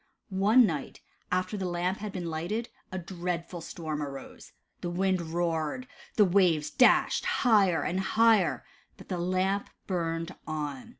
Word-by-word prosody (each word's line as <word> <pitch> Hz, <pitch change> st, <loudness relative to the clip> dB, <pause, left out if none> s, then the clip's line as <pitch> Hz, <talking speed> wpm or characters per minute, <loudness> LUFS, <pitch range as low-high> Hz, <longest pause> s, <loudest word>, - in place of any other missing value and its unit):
One 215 Hz, +6 st, +5 dB
night 155 Hz, -8 st, -4 dB, 0.3 s
after 185 Hz, +3 st, 0 dB
the 190 Hz, -2 st, -2 dB
Lamp 180 Hz, +2 st, -1 dB
had 210 Hz, 0 st, -5 dB
been 185 Hz, -2 st, -5 dB
lighted, 170 Hz, +9 st, -3 dB, 0.2 s
a 185 Hz, -, -3 dB
dreadful 175 Hz, -1 st, -4 dB
storm 155 Hz, -2 st, -5 dB
arose. 140 Hz, -2 st, -8 dB, 0.3 s
The 175 Hz, -, -3 dB
wind 185 Hz, +1 st, +1 dB
roared. 165 Hz, +5 st, -2 dB, 0.3 s
The 210 Hz, -, +6 dB
waves 175 Hz, -5 st, +3 dB
dashed 250 Hz, -, +4 dB
higher 195 Hz, -, +3 dB
and 180 Hz, +3 st, -1 dB
higher, 220 Hz, +1 st, +3 dB, 0.3 s
but -, -, -14 dB
the 180 Hz, -2 st, -2 dB
Lamp 185 Hz, +3 st, 0 dB, 0.2 s
burned 165 Hz, -1 st, -2 dB
on. 150 Hz, -4 st, -4 dB
180 Hz, 140 wpm, -29 LUFS, 165-195 Hz, 0.3 s, The